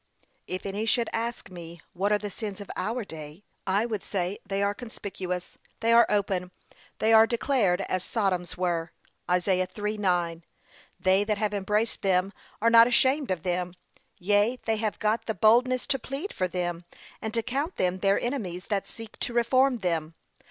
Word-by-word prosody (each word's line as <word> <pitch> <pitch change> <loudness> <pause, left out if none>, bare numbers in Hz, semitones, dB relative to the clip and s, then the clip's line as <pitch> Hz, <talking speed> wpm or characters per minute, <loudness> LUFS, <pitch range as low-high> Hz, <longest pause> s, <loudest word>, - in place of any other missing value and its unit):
If 185 - -4
any 205 +3 -2
should 235 0 +2
ask 230 -3 -3
me 170 -1 -9
what 195 +3 0
are 210 - +5
the 205 -1 -6
sins 210 -1 -6
of 200 - -7
our 225 +5 -2
day, 155 +2 -9 0.2
I 200 +4 +2
would 215 -4 -3
say 185 0 -2
they 195 0 -1
are 200 0 +1
conspicuous, 190 -5 -6 0.2
they 230 0 +2
are 235 0 +7
open, 195 -3 0 0.5
they 220 +1 +3
are 220 0 +8
declared 230 -7 +1
as 185 -1 -2
Sodom's 185 -6 -1
were. 175 -2 -1 0.4
(Isa. 180 +2 +2 0.2
3:9) 185 -6 -1 0.6
They 190 +2 +3
that 210 0 0
have 210 0 -1
embraced 210 +3 0
them, 190 0 +2 0.3
are 230 - +5
not 230 0 +9
ashamed 260 +3 +2
of 180 -4 -1
them; 180 0 -2 0.4
yea, 205 +5 +2
they 225 -1 +1
have 215 -1 -2
got 220 +1 0
the 220 - -1
boldness 245 +6 +4
to 270 - 0
plead 275 - -5
for 185 - 0
them, 175 -1 -3 0.4
and 220 - -3
to 230 - +1
count 280 +9 -2
them 185 0 0
their 195 +1 +3
enemies 195 -9 -3
that 200 -3 -1
seek 225 -1 -10
to 240 - -3
reform 255 +2 +3
them. 165 -3 -1
205 Hz, 175 wpm, -27 LUFS, 180-230 Hz, 0.6 s, not